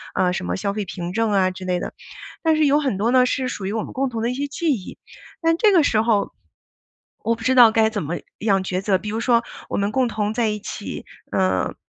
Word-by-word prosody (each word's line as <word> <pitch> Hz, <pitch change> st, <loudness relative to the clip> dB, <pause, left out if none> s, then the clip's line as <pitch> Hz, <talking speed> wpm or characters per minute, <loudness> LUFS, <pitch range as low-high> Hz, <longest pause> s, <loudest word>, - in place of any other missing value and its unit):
呃， 180 Hz, -1 st, +2 dB
什 90 Hz, -, -3 dB
么 90 Hz, 0 st, -1 dB
消 200 Hz, -, -2 dB
费 210 Hz, -1 st, -3 dB
凭 175 Hz, -1 st, -5 dB
证 225 Hz, +1 st, +1 dB
啊 185 Hz, -1 st, +3 dB
之 185 Hz, 0 st, -9 dB
类 180 Hz, -1 st, 0 dB
的， -, -, -5 dB, 0.5 s
但 320 Hz, -1 st, +3 dB
是 310 Hz, -1 st, +3 dB
有 290 Hz, +1 st, +4 dB
很 265 Hz, -9 st, -1 dB
多 225 Hz, +5 st, +1 dB
呢 255 Hz, -1 st, +5 dB
是 255 Hz, 0 st, -1 dB
属 200 Hz, -5 st, -5 dB
于 200 Hz, -, -2 dB
我 220 Hz, -, -1 dB
们 -, -, -8 dB
共 270 Hz, +1 st, 0 dB
同 225 Hz, -2 st, -4 dB
的 235 Hz, -, 0 dB
一 -, -, -2 dB
些 285 Hz, +2 st, -2 dB
记 320 Hz, +2 st, -1 dB
忆， 195 Hz, -7 st, -7 dB, 0.4 s
但 330 Hz, 0 st, +2 dB
这 425 Hz, +1 st, +4 dB
个 330 Hz, -4 st, +5 dB
时 220 Hz, -6 st, +2 dB
候， 220 Hz, -3 st, +1 dB, 0.9 s
我 230 Hz, +1 st, +2 dB
不 225 Hz, -, -11 dB
知 260 Hz, +2 st, +2 dB
道 235 Hz, -3 st, +8 dB
该 220 Hz, -1 st, +3 dB
怎 210 Hz, -2 st, -3 dB
么 165 Hz, +4 st, -3 dB, 0.2 s
样 195 Hz, -3 st, +2 dB
抉 185 Hz, 0 st, -2 dB
择。 195 Hz, -1 st, +2 dB
比 210 Hz, +3 st, -6 dB
如 220 Hz, -, -2 dB
说 235 Hz, 0 st, +3 dB, 0.3 s
我 -, -, -3 dB
们 200 Hz, +1 st, 0 dB
共 255 Hz, +1 st, +2 dB
同 215 Hz, -1 st, -2 dB
在 235 Hz, -1 st, +1 dB
一 210 Hz, 0 st, -3 dB
起， -, -, -6 dB, 0.3 s
呃， 95 Hz, 0 st, +1 dB
220 Hz, 280 characters per minute, -22 LUFS, 195-255 Hz, 0.9 s, 道